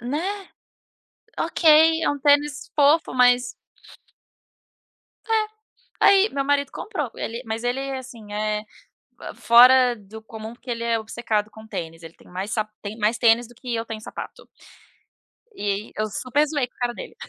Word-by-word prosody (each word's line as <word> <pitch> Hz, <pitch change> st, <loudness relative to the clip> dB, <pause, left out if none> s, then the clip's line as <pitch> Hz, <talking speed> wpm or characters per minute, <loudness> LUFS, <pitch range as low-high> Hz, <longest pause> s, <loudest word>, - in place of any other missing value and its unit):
Né, 355 Hz, -, -3 dB, 0.9 s
ok, 320 Hz, 0 st, +4 dB
é -, -, +2 dB
um 290 Hz, -, -2 dB
tênis 290 Hz, +1 st, +2 dB
fofo, 300 Hz, +2 st, +3 dB
mas 245 Hz, 0 st, +4 dB, 1.8 s
é, 445 Hz, -1 st, +3 dB, 0.6 s
aí 395 Hz, +2 st, +6 dB
meu 275 Hz, -1 st, -2 dB
marido 285 Hz, 0 st, +1 dB
comprou, 320 Hz, -, -4 dB
ele 235 Hz, +2 st, -5 dB
mas 225 Hz, 0 st, -4 dB
ele 245 Hz, +2 st, -1 dB
é 270 Hz, -1 st, -4 dB
assim 230 Hz, -5 st, -11 dB
é, 210 Hz, 0 st, -2 dB, 0.7 s
fora 250 Hz, +1 st, +6 dB
do 215 Hz, +1 st, -12 dB
comum 220 Hz, +1 st, -9 dB
por -, -, -22 dB
que 255 Hz, -, -6 dB
ele 235 Hz, 0 st, -3 dB
é 230 Hz, -1 st, +1 dB
obcecado 220 Hz, -1 st, -2 dB
com 220 Hz, +1 st, -13 dB
tênis, 165 Hz, -3 st, -7 dB
ele 165 Hz, 0 st, -11 dB
tem -, -, -21 dB
mais 190 Hz, +4 st, -5 dB
sap 215 Hz, -1 st, -1 dB
tem 205 Hz, +1 st, -7 dB
mais 220 Hz, +1 st, +1 dB
tênis 235 Hz, 0 st, +3 dB
do 240 Hz, -, -18 dB
que 245 Hz, 0 st, -6 dB
eu 225 Hz, 0 st, -3 dB
tenho 220 Hz, -1 st, -7 dB
sapato. -, -, -9 dB, 1.1 s
E 205 Hz, -, -3 dB
eu 215 Hz, 0 st, -1 dB
super 270 Hz, +7 st, 0 dB
zoei 285 Hz, -4 st, -1 dB
com -, -, -40 dB
o -, -, -35 dB
cara 240 Hz, -1 st, -1 dB
dele. -, -, -9 dB
240 Hz, 165 wpm, -23 LUFS, 220-285 Hz, 1.8 s, aí